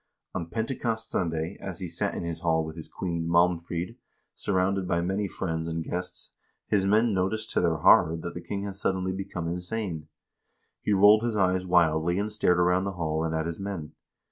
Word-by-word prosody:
On 85 Hz, -, -4 dB
Pentecost 115 Hz, +2 st, -2 dB
Sunday, 80 Hz, +1 st, -1 dB
as 95 Hz, -3 st, -5 dB
he 90 Hz, -, -4 dB
sat 85 Hz, +1 st, -2 dB
in -, -, -3 dB
his 85 Hz, -1 st, -4 dB
hall 80 Hz, -1 st, +1 dB
with 80 Hz, 0 st, -7 dB
his 80 Hz, -, -8 dB
queen, 85 Hz, -3 st, -3 dB
Malmfrid, 85 Hz, +4 st, +1 dB, 0.4 s
surrounded 95 Hz, -1 st, 0 dB
by 85 Hz, -, +1 dB
many 95 Hz, +4 st, -1 dB
friends 80 Hz, -3 st, -3 dB
and 80 Hz, 0 st, -2 dB
guests, 90 Hz, +2 st, -5 dB, 0.3 s
his 95 Hz, -2 st, +1 dB
men 110 Hz, +2 st, +3 dB
noticed 110 Hz, +4 st, -1 dB
to -, -, +2 dB
their 85 Hz, -2 st, +2 dB
horror 80 Hz, +1 st, +5 dB
that 85 Hz, +1 st, -6 dB
the 85 Hz, -, -6 dB
king 100 Hz, +2 st, -4 dB
had 100 Hz, -1 st, -5 dB
suddenly 95 Hz, -2 st, 0 dB
become 95 Hz, -3 st, -4 dB
insane. 90 Hz, -2 st, -3 dB, 0.7 s
He -, -, -1 dB
rolled 105 Hz, +2 st, +7 dB
his 115 Hz, -1 st, -1 dB
eyes 95 Hz, -1 st, +2 dB
wildly 85 Hz, -1 st, +3 dB
and 105 Hz, +2 st, -1 dB
stared 90 Hz, -4 st, +2 dB
around 90 Hz, +2 st, +3 dB
the 100 Hz, -, -2 dB
hall 80 Hz, -2 st, -1 dB
and 80 Hz, 0 st, -1 dB
at 80 Hz, 0 st, -1 dB
his 85 Hz, 0 st, -4 dB
men. 95 Hz, -6 st, -5 dB
90 Hz, 195 wpm, -27 LUFS, 85-100 Hz, 0.7 s, rolled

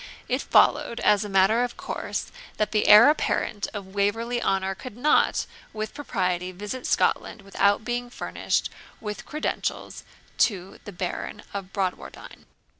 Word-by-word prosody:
It -, -, 0 dB
followed 235 Hz, -, +3 dB
as 205 Hz, -1 st, +4 dB
a 210 Hz, -, -6 dB
matter 195 Hz, +5 st, +4 dB
of 245 Hz, -, -4 dB
course, -, -, -4 dB, 0.3 s
that 215 Hz, -, 0 dB
the 210 Hz, -, +1 dB
heir 215 Hz, +5 st, +10 dB
apparent 210 Hz, -8 st, -1 dB
of 195 Hz, -2 st, -8 dB
Waverley 225 Hz, +4 st, 0 dB
Honour 195 Hz, -2 st, 0 dB
could 230 Hz, +3 st, -10 dB
not 300 Hz, +5 st, +3 dB, 0.3 s
with 215 Hz, 0 st, -4 dB
propriety 185 Hz, -10 st, -2 dB
visit 210 Hz, +7 st, -6 dB
Scotland 205 Hz, -, 0 dB
without 200 Hz, +2 st, +1 dB
being 245 Hz, 0 st, -2 dB
furnished -, -, -2 dB, 0.3 s
with 210 Hz, -2 st, -6 dB
credentials 305 Hz, +1 st, -3 dB, 0.4 s
to 195 Hz, -3 st, 0 dB
the 205 Hz, -, -7 dB
Baron 185 Hz, +3 st, -5 dB
of 195 Hz, -2 st, -5 dB
Bradwardine. 190 Hz, -3 st, -5 dB
205 Hz, 140 wpm, -25 LUFS, 195-235 Hz, 0.4 s, heir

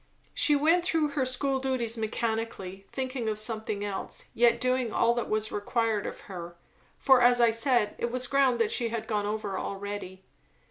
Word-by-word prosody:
She 295 Hz, -, +3 dB
went 325 Hz, +5 st, +3 dB
through 325 Hz, -4 st, +1 dB
her 280 Hz, -2 st, -1 dB
school 265 Hz, +1 st, 0 dB
duties 255 Hz, -4 st, -1 dB
mechanically, 220 Hz, -4 st, -3 dB
thinking 255 Hz, -3 st, -3 dB
of 215 Hz, -, -2 dB
something 215 Hz, -2 st, -2 dB
else, 200 Hz, -2 st, -4 dB
yet 235 Hz, 0 st, +4 dB
doing 255 Hz, -2 st, +1 dB
all 235 Hz, +2 st, +3 dB
that 240 Hz, -1 st, -3 dB
was 215 Hz, 0 st, -1 dB
required 220 Hz, 0 st, -1 dB
of -, -, -7 dB
her; 175 Hz, -3 st, -8 dB, 0.4 s
for, 265 Hz, -2 st, +5 dB
as 245 Hz, 0 st, +5 dB
I 235 Hz, -1 st, +5 dB
said, 230 Hz, -2 st, +1 dB
it 235 Hz, -, -1 dB
was 255 Hz, +1 st, 0 dB
ground 270 Hz, -2 st, +3 dB
that 230 Hz, -2 st, +1 dB
she 235 Hz, -2 st, 0 dB
had 225 Hz, -1 st, -4 dB
gone 210 Hz, -2 st, -1 dB
over 210 Hz, -2 st, -3 dB
already. 195 Hz, -1 st, -6 dB
230 Hz, 180 wpm, -28 LUFS, 210-255 Hz, 0.4 s, for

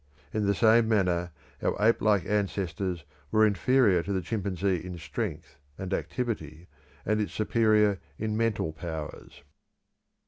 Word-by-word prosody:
In 105 Hz, -2 st, 0 dB
the 100 Hz, -, +2 dB
same 115 Hz, +1 st, +5 dB
manner 90 Hz, -5 st, +1 dB, 0.3 s
our -, -, 0 dB
ape 110 Hz, +2 st, +3 dB
like 105 Hz, -5 st, +3 dB
ancestors 95 Hz, -4 st, -2 dB, 0.2 s
were 110 Hz, +5 st, +4 dB
inferior 105 Hz, -2 st, +3 dB
to 100 Hz, -, -5 dB
the 95 Hz, -2 st, -1 dB
chimpanzee 95 Hz, -3 st, -1 dB
in 90 Hz, -1 st, -7 dB
strength 70 Hz, -3 st, -5 dB, 0.2 s
and 95 Hz, 0 st, -4 dB
activity, 90 Hz, -, -3 dB, 0.4 s
and 110 Hz, +1 st, +1 dB
its 105 Hz, -, -3 dB
superior 105 Hz, -2 st, +3 dB, 0.2 s
in 110 Hz, 0 st, -2 dB
mental 110 Hz, -8 st, 0 dB
powers. 80 Hz, -3 st, -7 dB
100 Hz, 135 wpm, -28 LUFS, 90-110 Hz, 0.4 s, same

